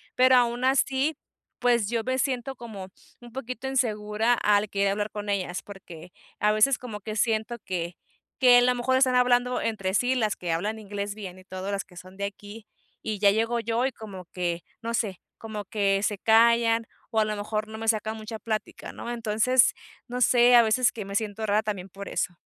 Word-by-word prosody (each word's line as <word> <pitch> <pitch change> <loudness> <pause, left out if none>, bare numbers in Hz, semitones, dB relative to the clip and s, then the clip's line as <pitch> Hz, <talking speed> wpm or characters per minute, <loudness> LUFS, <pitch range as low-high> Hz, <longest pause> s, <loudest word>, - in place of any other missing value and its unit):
pero 255 +1 +6
aún 240 0 +1
así, 270 +3 +2 0.4
pues 240 -4 +2
yo 230 -1 -1
me 260 0 0
siento 260 0 -1
como 215 -6 -8 0.3
un 240 -1 -13
poquito 255 +1 -5
insegura 220 -3 +1
al 210 -2 +2
querer 200 0 +1
hablar 210 +1 -3
con 210 0 -6
ellas, 190 -2 -2
porque 180 -4 -12 0.3
a 210 0 +3
veces 230 +5 +4
como 220 -5 -8
que 215 +1 -5
siento 220 +1 0
que 175 -2 -3 0.4
que 250 -2 +7
a - - +4
lo 250 0 +4
mejor 245 +2 +1
están 260 -1 +3
hablando 250 0 +3
entre 195 -4 -2
sí 250 +4 +2
las 215 -4 0
que 175 -2 -3
hablan 210 +7 -2
inglés 205 -1 -5
bien 190 -4 -8
y 185 - -16
todo, 190 +1 -5
las 200 - -2
que 180 -2 -18
son 185 +1 -12
de 200 - -4
aquí 205 +2 -9 0.3
y 215 -2 -4
ya 200 -1 +5
llego 230 +3 0
yo, 230 +2 0
y 265 - 0
como 200 -6 -10
que, 175 -2 -2 0.2
no 230 +1 -3
sé, 205 -6 -1 0.2
como 215 -2 -6
que 195 -1 +1
se 210 -1 0
callan 230 +1 +4 0.3
o - - +4
a 215 - +3
lo 215 0 -2
mejor 215 +1 -3
no 220 - -8
me 225 0 -5
sacan 220 0 +1
mucha 220 +1 -7
plática, 215 -1 -4
¿no? 240 - -6
Entonces, 230 +2 +3 0.3
no 250 0 -4
sé, 245 0 +6
a 235 - +8
veces 225 +2 +3
que 210 -4 -7
me 200 - -7
siento 220 0 -2
rara 210 +1 +2
también 195 -3 -4
por 200 +2 -9
eso. 180 - -2
220 Hz, 210 wpm, -26 LUFS, 200-240 Hz, 0.4 s, a